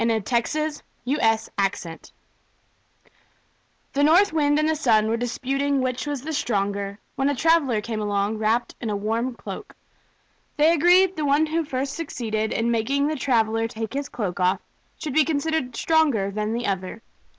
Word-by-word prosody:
Orthographic 240 +7 0 0.3
version 220 - 0 1.9
The 285 - +2
North 335 +5 +5
Wind 290 -2 +2
and 305 0 +2
the 315 - +1
Sun 225 -8 +3
were 225 - +1
disputing 270 +4 -1
which 255 +2 -2
was 285 -3 -3
the 315 +2 -4
stronger, 200 -6 -1 0.2
when 270 0 +1
a 285 - 0
traveler 285 -7 +2
came 220 0 -4
along 205 +1 -1
wrapped 225 +2 0
in 230 - -3
a 210 - -1
warm 225 +5 -2
cloak. - - -8 0.8
They 310 +3 +5
agreed 355 +4 +5
that 380 - -23
the 305 - -1
one 290 +2 +3
who 325 +2 -1
first 270 -1 -3
succeeded 220 -9 -3
in 230 +1 0
making 260 +5 +1
the 310 - -1
traveler 225 -4 +1
take 225 0 -6
his 280 +1 -3
cloak 195 -5 -4
off 180 0 +2 0.4
should 300 -4 -5
be 310 - +5
considered 290 -4 -1
stronger 280 -11 +2
than 210 +2 -2
the 240 +1 -2
other. 190 +3 -3
245 Hz, 160 wpm, -24 LUFS, 220-295 Hz, 1.9 s, North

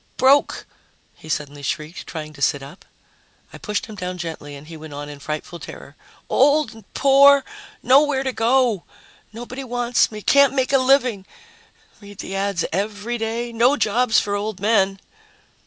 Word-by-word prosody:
"Broke!" 275 +2 +3 0.5
he 155 - -15
suddenly 145 -1 -4
shrieked, 155 +5 -5
trying 155 -2 -7
to 140 - -14
sit 145 -1 +1
up. 140 +7 -13 0.7
I - - -10
pushed 210 -3 -3
him 220 - -11
down 185 -2 -5
gently, 160 -4 -7
and 140 +1 -12
he 165 +1 -10
went 155 -2 -10
on 145 0 -7
in 145 -1 -10
frightful 155 +3 -6
terror, - - -11 0.3
"Old 290 +2 +3
and 220 -3 -17
poor, 280 0 +6 0.4
nowhere 270 +2 +4
to 265 -1 -2
go, 235 -4 +2 0.5
nobody 245 +4 -8
wants 245 -1 +1
me, 210 -1 -8
can't 280 0 +4
make 260 0 0
a 270 - +5
living, 255 -7 +2 0.7
read 205 -1 -13
the 195 - -6
ads 195 -3 -1
every 210 +5 -3
day, 230 +2 -3
no 245 +5 +3
jobs 225 +1 +2
for 200 - -3
old 205 0 -3
men." 195 -2 +2
215 Hz, 165 wpm, -21 LUFS, 170-255 Hz, 0.7 s, poor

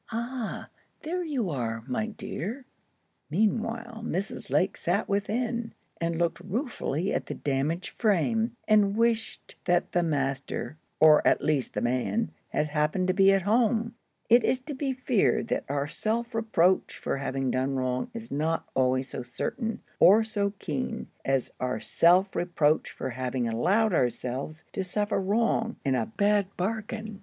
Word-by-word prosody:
"Ah, 235 +1 -4 0.3
there 355 +3 -2
you 260 - -1
are, 115 -4 -3
my 135 - -1
dear!" 225 - -5 0.6
Meanwhile, 225 +5 -1
Mrs. 195 -1 -4
Lake - - +2
sat - - 0
within, 225 +3 -1 0.3
and 165 0 0
looked 170 0 0
ruefully 195 - -2
at - - -2
the - - -4
damaged 150 +6 -1
frame, 225 +3 +2
and 210 -1 +4
wished 230 -1 -1
that 175 -1 +2
the 175 - +2
master, 140 -2 -2 0.2
or 155 -1 +7
at - - +3
least 150 -4 0
the - - 0
man, 130 - 0 0.2
had 150 - 0
happened 155 +5 0
to - - +4
be 195 0 +6
at 195 -2 +2
home. 225 +2 +2 0.3
It 240 0 +6
is 255 - +2
to 290 +3 -6
be 270 0 -1
feared 255 -4 +1
that - - -1
our 140 0 -1
self 230 +8 -2
reproach 205 -5 +2
for - - -2
having 135 -1 -1
done 130 +2 0
wrong 130 - -1
is 230 -1 -8
not 160 +3 -1
always 130 0 +1
so - - -5
certain, 225 - -4 0.2
or 210 +5 +7
so 205 -2 -1
keen, 145 -8 -4
as 135 -2 0
our 125 -3 -1
self 180 - +3
reproach 160 -3 +1
for - - -5
having 125 0 -2
allowed 190 - +2
ourselves 130 +3 -1
to 195 - -1
suffer 205 +2 -1
wrong—in 225 - 0
a 115 -4 0
bad 200 - +2
bargain. 220 +1 -3
195 Hz, 150 wpm, -28 LUFS, 145-225 Hz, 0.6 s, or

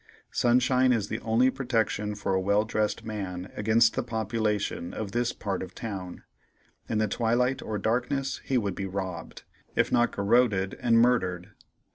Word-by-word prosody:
Sunshine 125 +1 +3
is 110 -4 0
the 110 - -3
only 120 +4 +3
protection 110 -5 -1
for 100 -2 -2
a 95 - +2
well 100 +3 +2
dressed 110 -1 -1
man 95 -4 -5
against 110 +2 +3
the - - +1
population 110 -5 -2
of 105 -3 -4
this 120 +1 0
part 100 -2 -3
of 95 - -5
the - - -27
town. 95 -5 -6 0.7
In 110 - 0
the 110 0 +2
twilight 120 +5 +1
or 110 - -3
darkness 125 +6 -1
he 130 - 0
would 100 -5 0
be 95 +1 -4
robbed, 95 -3 -5 0.3
if - - +2
not 120 0 +3
garroted 100 -2 +2
and 115 -1 +4
murdered. 95 -6 +1
110 Hz, 165 wpm, -27 LUFS, 100-120 Hz, 0.7 s, and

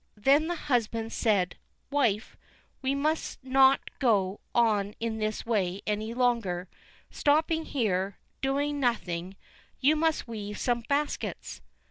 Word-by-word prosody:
Then 280 +8 +4
the 350 - -1
husband 230 -6 -1
said: 200 -6 +1 0.3
"Wife, 240 -7 +1 0.5
we 270 +1 0
must 310 +3 -1
not 265 +1 +5 0.2
go 205 -6 +2 0.2
on 210 -4 +2
in 225 -1 -2
this 215 0 -2
way 200 -5 0
any 215 +2 -2
longer, 230 -8 +1 0.4
stopping 315 +2 +2
here, 195 -7 -1 0.2
doing 285 +2 0
nothing; 190 -8 -1 0.4
you 285 +4 +4
must 320 -3 +1
weave 210 -2 -5
some 240 -1 +1
baskets." 290 +1 -2
235 Hz, 120 wpm, -28 LUFS, 205-280 Hz, 0.5 s, not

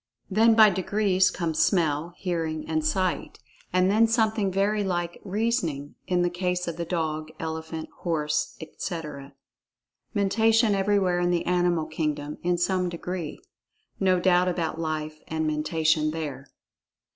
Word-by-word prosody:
Then 225 +3 +5
by 215 -2 +8
degrees 190 0 +2
come 170 -3 -2
smell, 165 -1 +1
hearing 165 -4 -3
and 155 -1 0
sight. 185 +4 -1 0.3
And 185 +1 +3
then 225 +2 +5
something 220 -3 +1
very 205 +2 +1
like 175 -2 -2
"reasoning" 195 - -1
in 180 -1 +2
the 175 - +2
case 180 0 -1
of 170 - -3
the 170 - -3
dog, 155 -2 -2
elephant, 160 0 -5
horse, 150 -3 -1
etc. 155 -4 -6 0.8
Mentation 220 +2 +3
everywhere 195 -2 +2
in 175 0 +1
the 175 -1 0
animal 175 -2 +1
kingdom, 150 -2 -3
in 175 0 +1
some 180 +1 +1
degree. 170 -2 -5 0.6
No 185 -1 +3
doubt 180 0 +3
about 165 -3 -2
Life 155 -1 -3
and 160 0 -2
Mentation, 155 0 +1
there. 145 -4 -5
175 Hz, 135 wpm, -26 LUFS, 155-190 Hz, 0.8 s, by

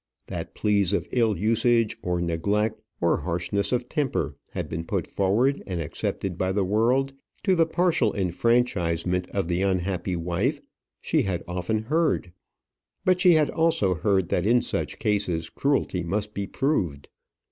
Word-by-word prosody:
That - - -6
pleas 100 -2 +2
of - - 0
ill 115 -4 +2
usage, 115 +3 +2
of 90 -1 -1
neglect, 105 +6 0 0.2
of 85 - +3
harshness 90 +3 -1
of 125 -1 0
temper, 145 -2 -1
had - - -4
been 80 +1 -4
put - - -2
forward 115 +9 +1
and 90 -3 -3
accepted 85 +3 -3
by 95 0 0
the 100 0 +1
world, 120 +8 +2 0.3
to 190 -3 +3
the 165 -2 +3
partial 165 - +2
enfranchisement 90 -3 +1
of 100 -4 -2
the 90 +1 0
unhappy 95 -1 0
wife, 85 0 -1 0.4
she - - +1
had 90 -3 -2
often 90 +5 -2
heard. 155 - 0 0.7
But 185 -1 +3
she 180 -2 +7
had 155 -2 +3
also 160 - +2
heard 95 +1 +1
that 90 +3 +1
in 120 +1 +4
such - - -3
cases 90 -6 -1
cruelty 135 -10 0
must 100 +5 -2
be 100 -1 -3
proved. 90 - -1
100 Hz, 155 wpm, -25 LUFS, 90-120 Hz, 0.7 s, she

